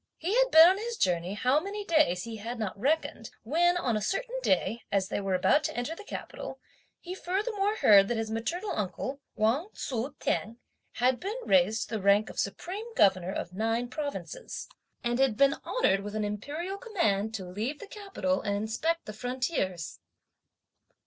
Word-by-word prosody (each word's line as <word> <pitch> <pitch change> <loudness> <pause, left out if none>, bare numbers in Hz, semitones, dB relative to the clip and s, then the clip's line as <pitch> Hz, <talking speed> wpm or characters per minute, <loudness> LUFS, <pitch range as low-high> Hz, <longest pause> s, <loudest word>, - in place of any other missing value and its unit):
He 355 +5 -2
had - - +4
been 320 -3 +10
on 375 +2 +4
his 465 +1 -4
journey 180 +1 0
how 255 +6 +3
many 400 +4 -5
days, 185 - +3
he 230 -1 -6
had 230 +4 -5
not 215 -4 -3
reckoned, 260 -1 -1
when, 345 +9 +3
on 245 -10 0
a 215 - 0
certain 480 - -2
day, 235 - +1
as 195 -1 +1
they - - -2
were 195 -1 0
about 240 +11 +3
to 315 - -3
enter 245 +7 -2
the 420 - -10
capital, - - -7 0.4
he 360 - -7
furthermore 400 +3 -1
heard 200 - +6
that 240 - -1
his 225 -1 -2
maternal 345 - -2
uncle, 215 +8 -3
Wang 235 - +1
Tzu 265 +2 -3
t'eng, 225 +2 -1 0.4
had 250 +1 +2
been 405 +6 -4
raised 260 -6 +3
to 225 - -2
the - - -6
rank 200 +2 +4
of - - -7
Supreme 390 - -4
Governor 190 -3 +4
of 180 - -5
nine 225 +4 -1
provinces, 295 - -5 0.4
and 240 +1 0
had 265 -5 +3
been 275 0 +5
honoured - - +2
with 205 +1 -6
an 215 -1 0
Imperial 300 - -4
command 220 - 0
to 190 -4 -5
leave 215 +11 -3
the 415 - -9
capital 390 - -2
and 200 -1 -1
inspect 315 +11 -1
the 215 - -7
frontiers. 245 - -2
245 Hz, 180 wpm, -29 LUFS, 210-345 Hz, 0.4 s, been